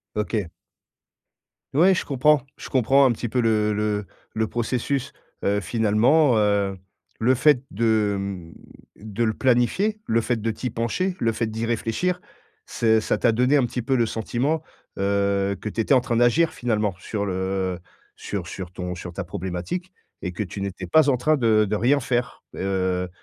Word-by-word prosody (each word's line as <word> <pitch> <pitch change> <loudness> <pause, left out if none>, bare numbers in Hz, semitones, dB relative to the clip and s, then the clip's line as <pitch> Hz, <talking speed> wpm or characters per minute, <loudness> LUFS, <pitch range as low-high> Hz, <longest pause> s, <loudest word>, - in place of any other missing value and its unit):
OK. 105 -3 -1 1.3
Ouais, 180 +7 +5
je - - -2
comprends 145 +1 +3 0.2
je - - -8
comprends 135 +2 +4
un 125 - +3
petit 120 0 -4
peu 125 - +1
le 110 -2 +2
le 105 -1 -1 0.3
le 110 0 0
processus, 120 +4 -2 0.3
heu, 100 +1 +1
finalement, 120 +6 +3
heu, 100 -2 +1 0.4
le 125 +4 +3
fait 130 0 +4
de, 110 -1 +1
mmh, 95 -4 -6 0.4
de 110 +2 -3
le 110 - +1
planifier, 130 - +1
le 115 +1 +2
fait 120 +2 0
de 115 - 0
t'y 125 +3 -4
pencher, 120 - -2
le 115 -1 +1
fait 115 +1 -1
d'y 110 +1 -4
réfléchir, 120 +10 -1 0.5
c'est 110 -1 +2
ça - - 0
t'a 120 - +2
donné 125 +5 +3
un 135 - +3
petit 120 +1 -3
peu 130 +3 0
le 120 - +3
sentiment, 125 +8 -1 0.4
heu, 100 0 +1
que 105 - -5
tu 115 - -3
étais 115 - +3
en 130 - +4
train 120 - -1
d'agir 120 +8 +3
finalement 105 -5 -1
sur 100 +1 -3
le 95 -1 -2 0.4
sur 95 -4 -5
sur 90 -1 -7
ton 90 0 -5
sur 90 -1 -8
ta 100 - -4
problématique 95 - -5 0.3
et 90 - -4
que 105 - -3
tu 100 0 -6
n'étais 95 -1 -5
pas 155 - +4
en 135 - +4
train 150 +5 +2
de 110 -3 +4
de 105 +2 -1
rien 130 +7 +3
faire, 125 -1 -2
heu, 95 -1 -1
110 Hz, 180 wpm, -23 LUFS, 100-125 Hz, 1.3 s, Ouais